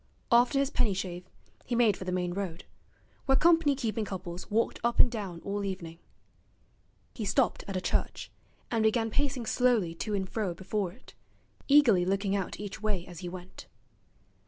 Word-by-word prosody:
After 240 +4 +5
his 275 0 +1
penny 210 -6 +1
shave 180 -1 -5 0.3
he 240 - -2
made 230 -4 +4
for 185 - -8
the 180 - -2
main 180 -1 -1
road, 180 -3 -4 0.6
where 270 - +5
company 325 -1 +4
keeping 225 -4 -2
couples 185 -3 -6
walked 225 +2 0
up 235 0 0
and 245 - +7
down 195 -7 -5
all 200 0 -2
evening. 170 -4 -5 1.1
He 225 - -5
stopped 220 +5 +1
at 195 -2 -3
a - - -2
church, - - -2 0.4
and 230 -2 +1
began 225 +1 +2
pacing 275 -3 0
slowly 230 -8 +2
to 205 +5 -3
and 190 -1 -2
fro 195 -4 -2
before 190 0 -2
it, 235 +8 -17 0.5
eagerly 270 -11 +6
looking 195 +2 0
out 195 -2 -3
each 205 0 -6
way 205 -5 -1
as 175 -2 -10
he 180 -2 -5
went. 180 +1 -10
205 Hz, 175 wpm, -29 LUFS, 185-235 Hz, 1.1 s, and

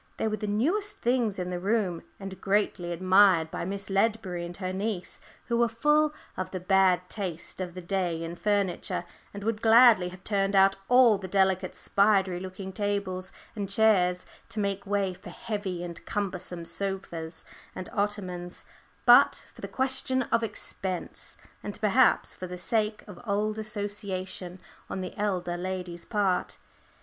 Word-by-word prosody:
They - - 0
were 215 - 0
the 210 - -4
newest 330 - +1
things 235 -4 +1
in 180 -1 -3
the 180 - -3
room, 195 -3 0 0.2
and 195 -1 -8
greatly 195 -3 0
admired 185 -2 +4
by 180 - -4
Miss 200 +2 -4
Ledbury 195 -3 0
and 175 - -9
her 185 -1 -3
niece, 195 -2 -3 0.2
who 235 - 0
were 235 - +4
full 300 +7 +2 0.2
of 185 - -3
the 185 - -4
bad 185 -1 +3
taste 185 -3 -4
of 180 -1 -5
the 180 - -7
day 175 -3 -1
in 165 +1 -5
furniture, 200 -1 -1 0.3
and 200 0 -8
would 220 0 -1
gladly 225 -5 +6
have 185 +1 -13
turned 200 -1 0
out 195 0 +6
all 245 -5 +6
the 190 - -6
delicate 190 0 +1
spidery 195 -3 +2
looking 190 +1 -7
tables 200 -2 -2 0.2
and 200 -3 -3
chairs 195 -4 +3 0.2
to 220 - -4
make 200 -1 -2
way 200 -2 0
for 180 - -12
heavy 195 -2 -4
and 170 -1 -6
cumbersome 185 -4 -3
sofas 170 -3 -3 0.3
and 185 - -5
ottomans, 185 -4 -3 0.4
but - - +6
for - - -14
the - - -4
question 260 0 +2
of 230 - +3
expense, 195 -4 -4 0.2
and 205 - -6
perhaps 230 +4 +3
for 185 - -7
the 180 0 -7
sake 215 +3 -1
of 200 -4 -11
old 210 +1 0
association 200 -4 -4 0.3
on 190 - -3
the 185 - -6
elder 185 -4 -1
lady's 180 -1 -5
part. 200 -4 0
195 Hz, 160 wpm, -28 LUFS, 180-210 Hz, 0.4 s, gladly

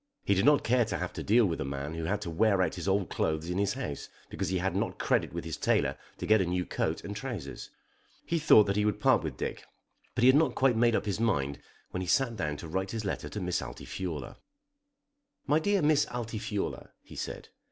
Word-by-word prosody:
He 100 - +3
did 95 - +2
not 145 -1 +5
care 125 +1 +3
to 110 - -3
have 90 - -4
to - - -5
deal 115 +2 +4
with 85 -4 -2
a - - 0
man 70 +2 -4
who 80 0 -4
had 100 +4 -1
to 85 - -4
wear 95 +2 +3
out - - -1
his 90 0 -5
old 95 -1 +1
clothes 80 +2 -1
in 90 - -1
his 100 0 +1
house 125 - -5 0.2
because 95 -3 -2
he 95 - 0
had 95 +2 -1
not - - -1
credit - - +1
with 85 -1 -5
his 80 - -4
tailor - - +1 0.2
to - - -4
get 110 -1 +5
a - - +1
new 90 0 -1
coat - - -2
and 100 - -6
trousers. 105 - -6 0.6
He 170 - 0
thought 125 -8 +7
that 100 -1 -1
he 105 - +2
would 105 0 0
part - - +4
with - - -5
Dick; - - -4 0.5
but - - +1
he - - +7
had 130 - +6
not 145 -4 +3
quite 130 -3 +3
made 115 0 +3
up - - 0
his 100 -1 -2
mind 70 -12 0 0.3
when 90 - -3
he 90 - -4
sat 120 +6 +2
down 75 -7 -2
to 80 - -8
write 95 +4 -2
his 110 -1 -4
letter 100 - -3
to 105 - -5
Miss 90 -2 -1
Altifiorla. 80 -9 -6 1.1
"My 145 +2 +3
dear 200 +2 +1
Miss 150 -1 +4
Altifiorla," 110 -4 -4
he - - -13
said. - - -6
100 Hz, 240 wpm, -30 LUFS, 90-115 Hz, 1.1 s, thought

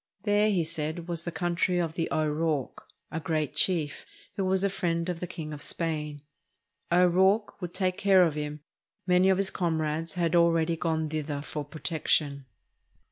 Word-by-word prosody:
There, 205 +1 +3
he 185 -5 +2
said, 160 +1 -4
was 170 -1 -3
the 170 - -2
country 175 +1 0
of 165 -2 0
the 165 0 -2
O'Rourke, 155 -2 -1 0.2
a 160 - -2
great 155 -2 -1
chief, 160 -6 0 0.3
who 195 - -1
was 190 0 +1
a 200 - +3
friend 170 -2 -1
of 175 -2 -3
the 180 - -4
King 160 -3 -6
of 145 - -8
Spain. 150 -3 -3 0.7
O'Rourke 190 +5 +3
would 175 -1 -5
take 185 -1 0
care 195 -2 +6
of 165 -3 +2
him; 150 0 -4 0.4
many 180 +1 +4
of 190 - +4
his 195 0 0
comrades 160 -1 -1
had 170 -2 +1
already 170 -1 +3
gone 160 -1 -1
thither 150 -2 -3
for 150 0 -4
protection. 145 -2 -1
165 Hz, 170 wpm, -28 LUFS, 155-180 Hz, 0.7 s, care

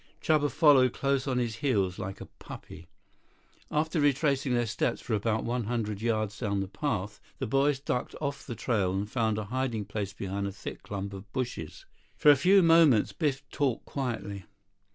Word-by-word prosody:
Chuba 150 -2 +2
followed 135 -6 +5
close 140 0 0
on 130 -2 0
his 120 -3 -1
heels 100 -10 0
like 95 +1 -5
a - - -7
puppy. - - -11 0.8
After 155 +1 0
retracing 140 -2 +2
their 120 0 +2
steps 110 - -1
for 115 - -4
about 110 +1 0
one 120 -1 -1
hundred 110 -3 -2
yards 110 -2 -1
down 100 -4 -1
the 95 - -2
path, 105 -3 -3 0.2
the - - -2
boys 135 +3 +2
ducked 125 -2 -3
off 140 -2 -3
the 120 - -4
trail 100 -8 0
and 100 +2 -1
found 110 -2 0
a 110 - -2
hiding 125 -5 -1
place 100 -2 -4
behind 100 +1 -3
a - - -4
thick 100 - -8
clump 100 0 -5
of 100 +1 -10
bushes. 125 - -4 0.3
For 150 - +6
a - - +7
few 185 +7 +5
moments 165 -9 +5
Biff 140 -3 -1
talked 135 -5 -1
quietly. 105 -8 -4
120 Hz, 180 wpm, -29 LUFS, 105-140 Hz, 0.8 s, a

